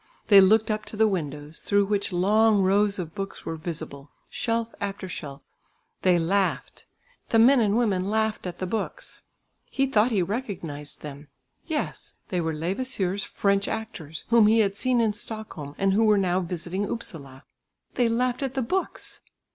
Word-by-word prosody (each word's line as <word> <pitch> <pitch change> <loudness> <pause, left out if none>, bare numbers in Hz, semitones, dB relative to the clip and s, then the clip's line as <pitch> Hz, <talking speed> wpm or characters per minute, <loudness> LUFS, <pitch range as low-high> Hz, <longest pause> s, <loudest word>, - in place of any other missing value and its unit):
They 200 -2 +9
looked 215 +3 +4
up 215 0 -2
to 215 - -9
the 220 0 +5
window's, 150 -5 -4
through 200 -1 +2
which 200 0 -1
long 205 +3 +4
rows 200 +2 +3
of 165 -4 -5
books 195 0 -6
were 165 - -3
visible, 155 -3 -6 0.2
shelf 230 -1 -1
after 195 -1 -4
shelf. 145 -5 -7 0.6
They 180 -2 +4
laughed, 190 +4 -1 0.4
the 225 - +3
men 250 +4 +6
and 210 -1 +2
women 195 -5 +1
laughed 220 -2 0
at 175 -1 -6
the 185 - -3
books. 215 +4 -4 0.4
He 270 - 0
thought 230 -3 +3
he 205 -6 +1
recognised 175 - -5
them. 145 0 -9 0.4
Yes, 315 -3 -4
they 180 -4 0
were 160 -1 -1
Levasseur's 190 +2 -1
French 200 0 0
actors, 170 -9 -6
whom 230 -2 +6
he 225 +1 +5
had 200 -2 0
seen 255 +3 +1
in 220 -2 +2
Stockholm 210 -9 -6
and 195 0 +2
who 220 +3 +3
were 210 -1 +5
now 185 -2 +2
visiting 180 +2 -3
Upsala. 140 - -6 0.5
They 245 -2 +2
laughed 245 +2 0
at 270 -1 -3
the 265 - 0
books! 375 +11 -3
200 Hz, 170 wpm, -26 LUFS, 175-220 Hz, 0.6 s, They